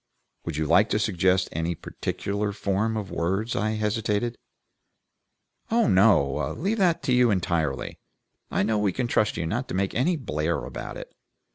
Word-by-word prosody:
"Would 80 -3 -3
you 80 - 0
like 95 +8 +4
to - - +1
suggest 95 -3 +2
any 80 +2 -2
particular 100 +5 -3
form 105 +3 -1
of 100 -4 -5
words?" 95 +7 -1
I 110 +1 0
hesitated. 110 +2 -1 1.3
"Oh 230 +1 +3
no! 95 - +3
Leave 205 +7 -1
that 175 -4 +2
to 130 - +1
you 125 -1 +5
entirely. 85 - -1 0.5
I - - +1
know 110 +1 +1
we 100 -3 +1
can 125 - -1
trust 110 -2 +1
you 85 - -2
not 120 +10 -2
to - - -4
make 95 0 0
any 165 +9 +2
blare 80 - -2
about - - -7
it. - - -10
100 Hz, 165 wpm, -26 LUFS, 85-115 Hz, 1.3 s, you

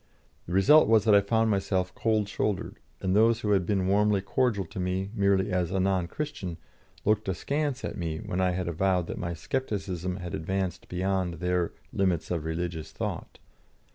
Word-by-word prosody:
The 85 - -4
result 145 +12 +6
was 110 -2 +5
that 110 - +5
I 100 - +7
found 110 +2 +2
myself 95 -2 0
cold 110 -3 +1
shouldered, 100 -1 -2 0.2
and 95 0 +1
those 115 +2 +4
that 105 - 0
had 95 -4 +2
been 95 -3 +1
warmly 100 +1 +3
cordial 105 0 0
to 85 - -8
me 95 +2 -2
merely 100 -3 +2
as 90 -2 0
a 95 0 -1
non 95 -2 +1
Christian 95 - -5 0.5
looked 105 -1 +2
askance 140 - -1
at - - -5
me 80 -2 -2
when 90 +3 -3
I 95 - +3
had 90 0 -2
avowed 90 +1 +1
that - - -6
my 85 -1 -3
scepticism 95 -5 -3
had 90 -3 -6
advanced 95 +2 -3
beyond 90 -1 -1
their 90 0 -1 0.2
"limits 90 -5 0
of 85 -3 -2
religious 80 -1 -3
thought." - - -5
95 Hz, 180 wpm, -28 LUFS, 90-105 Hz, 0.5 s, I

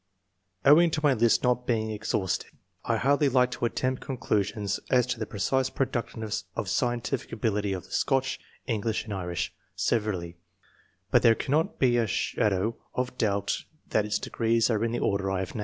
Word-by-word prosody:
Owing 160 +5 +7
to 155 -1 -2
my 145 -2 +5
list 115 -1 +3
not 125 -1 +1
being 110 -2 0
ex 110 0 -4
haustive, 95 -5 -1 0.3
I - - +1
hardly 140 +2 +3
like 125 -1 +3
to 120 - -2
attempt 130 +2 -1
conclusions 105 -5 -1
as 125 -2 +4
to 125 -2 -3
the 110 - -3
precise 130 +6 0
productiveness 110 -6 -3
of - - -2
scien 120 +4 0
tific 135 - -3
ability 105 -3 -1
of 95 -3 -3
the - - -18
Scotch, 135 -1 +1 0.3
EngKsh, 110 -2 -1
and 110 - -6
Irish 90 -3 -3 0.2
severally, 95 -7 -1 0.7
but - - +5
there 115 -1 +6
cannot 160 - 0
be 125 -2 +3
a 115 -2 +2
shadow 105 +2 0 0.2
of 125 0 -2
doubt 100 -3 0 0.3
that 105 - +2
its 105 0 0
degrees 115 +2 +1
are 110 0 +1
in 115 - 0
the 120 - -1
order 100 -3 0
I 95 - 0
have 95 - -5
named. - - -5
115 Hz, 185 wpm, -27 LUFS, 105-125 Hz, 0.7 s, Owing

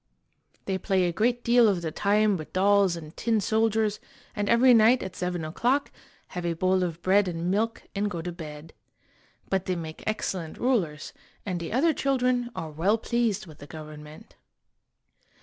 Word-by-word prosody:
They 190 -1 -1
play 190 -2 +1
a 175 - +1
great 240 +5 +1
deal 240 -1 +5
of 180 -4 -1
the 160 - -2
time 205 +3 +2
with 155 -4 -8
dolls 195 -1 +3
and 155 -2 -10
tin 225 -2 +1
soldiers, 220 0 +1 0.4
and 205 -1 -1
every 245 +2 +6
night 230 +2 +5
at 190 -1 -7
seven 180 -2 -3
o'clock 245 - 0 0.4
have 180 - -5
a 170 -1 0
bowl 185 +2 +2
of 175 -2 -3
bread 195 +1 +4
and 170 0 -2
milk 225 +3 -1
and 205 +1 -1
go 175 - -5
to 175 - -4
bed. 155 -2 -9 0.7
But 190 -1 -1
they 185 - -1
make 160 -2 -7
excellent 185 -6 -3
rulers, 180 -12 -1 0.3
and 180 -3 -2
the 170 - -5
other 310 +7 +3
children 250 -3 0
are 160 -1 -5
well 185 +9 +1
pleased 225 -3 -1
with 155 -4 -14
the 145 - -11
government. 155 -1 -11
190 Hz, 175 wpm, -26 LUFS, 170-225 Hz, 0.7 s, every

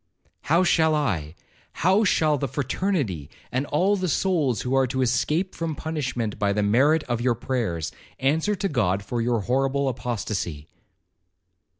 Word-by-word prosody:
How 170 +4 +5
shall 160 -3 +3
I—how 145 - -1
shall 155 -5 +3
the 140 - -1
fraternity, 135 - -2 0.2
and 130 +3 -1
all 185 +7 +2
the 185 -2 -1
souls 155 - +1
who 125 - -2
are 135 -1 +3
to 130 +1 0
escape 150 +9 0
from 165 -2 -3
punishment 125 -9 -3
by 100 -1 +2
the 105 0 0
merit 140 +10 +3
of 120 -1 -2
your 120 -1 +2
prayers, 115 - -2 0.3
answer 160 +10 +1
to 195 - -1
God 100 - 0
for 120 +4 -2
your 115 -1 +1
horrible 135 +5 0
apostacy?' 105 - -3
130 Hz, 150 wpm, -24 LUFS, 115-160 Hz, 0.3 s, How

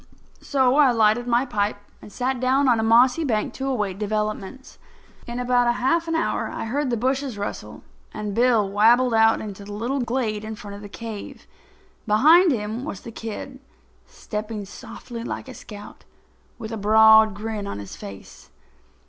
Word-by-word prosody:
So 265 -1 +2
I 290 -3 +6
lighted 225 0 +2
my 240 +2 +2
pipe 210 -5 -1 0.2
and 210 - -12
sat 255 +3 -2
down 265 +2 +2
on 240 -3 +3
a - - 0
mossy 245 +7 +4
bank 220 -7 -1
to 270 - -4
await 210 -7 -2
developments. 215 +3 -4 0.5
In 240 +1 -5
about 245 -1 +2
half 330 +7 +1
an 330 - -1
hour 325 - -1
I - - -5
heard 275 +4 -1
the 235 - 0
bushes 260 0 -1
rustle, 205 - -6 0.3
and 210 -1 -5
Bill 230 -2 +3
wabbled 230 +5 +4
out 225 0 +4
into 205 -2 -8
the 205 +1 -9
little 240 +7 -2
glade 235 -4 -2
in 220 0 -6
front 205 -1 -9
of 200 - -10
the 205 - -10
cave. 220 -1 -8 0.6
Behind 315 - +6
him 220 0 -3
was 200 -10 -6
the 230 - -9
kid, 230 +4 -7 0.5
stepping 210 -1 -6
softly 230 +3 -9
like 245 - -6
a 260 - -9
scout, 210 -4 -12 0.5
with 220 - -7
a 225 - -4
broad 220 0 +6
grin 210 -1 -5
on - - -5
his 100 -1 -8
face. 100 -1 -11
225 Hz, 175 wpm, -23 LUFS, 210-255 Hz, 0.6 s, I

